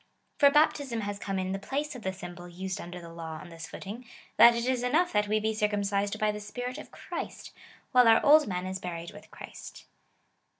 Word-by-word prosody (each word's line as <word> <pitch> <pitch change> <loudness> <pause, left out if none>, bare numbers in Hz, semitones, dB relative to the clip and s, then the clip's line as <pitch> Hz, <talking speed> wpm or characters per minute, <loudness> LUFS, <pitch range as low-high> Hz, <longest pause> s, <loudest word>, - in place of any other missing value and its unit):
For 285 - +8
baptism 285 -5 +2
has 205 -1 -4
come 195 -1 -3
in 185 0 -2
the 195 - -2
place 290 +8 -3
of 250 - -9
the 190 - -2
symbol 175 -1 -9
used 185 +2 -5
under 175 +1 -8
the 170 -1 -11
law 160 -1 -6
on 175 - -11
this 165 0 -9
footing, 215 +6 -8 0.3
that 235 +2 +9
it 235 0 -1
is 255 -1 +1
enough 310 +9 +2
that 210 0 +2
we 215 +1 +2
be 220 +1 0
circum 210 -1 0
cised 200 +1 0
by 215 0 +1
the 210 - -6
Spirit 245 +6 -5
of - - -10
Christ, - - -7 0.4
while 250 -2 +6
our 225 0 +5
old 300 0 +7
man 180 -1 -3
is 190 0 -4
buried 170 -2 -6
with - - -13
Christ. - - -11
210 Hz, 220 wpm, -29 LUFS, 185-245 Hz, 0.4 s, that